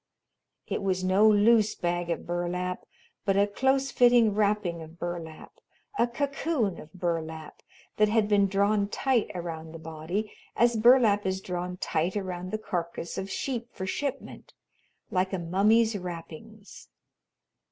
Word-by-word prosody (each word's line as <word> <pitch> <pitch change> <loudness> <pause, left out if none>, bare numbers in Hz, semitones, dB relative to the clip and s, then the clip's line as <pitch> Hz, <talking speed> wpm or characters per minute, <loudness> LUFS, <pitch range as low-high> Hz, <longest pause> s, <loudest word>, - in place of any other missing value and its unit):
It - - -3
was 185 -1 -1
no 190 +4 +4
loose 215 +1 +4
bag 175 0 -2
of 170 - -3
burlap 175 +1 -3 0.4
but 195 -1 +1
a 200 - +5
close 265 +6 +1
fitting 240 -3 +5
wrapping 205 -5 0
of 160 +1 -11
burlap; 170 -2 -6 0.5
a 240 - +4
cocoon 275 - -1
of 155 - -12
burlap 165 -3 -4 0.4
that 215 0 +4
had 220 -1 +2
been 205 -1 +3
drawn 200 +1 +2
tight 250 +2 0
around 165 -2 -6
the - - -7
body, 160 +6 -4 0.2
as 235 0 +3
burlap 220 -3 +5
is 190 0 -1
drawn 180 -1 -4
tight 175 +3 -1
around 185 -2 -4
the 215 - -2
carcass 170 -4 -4
of 190 +1 -5
sheep 240 +3 -3
for 190 - -4
shipment, 275 +8 -5 0.6
like 185 +1 0
a - - 0
mummy's 210 +6 +3
wrappings. 180 +4 -9
195 Hz, 140 wpm, -27 LUFS, 175-215 Hz, 0.6 s, a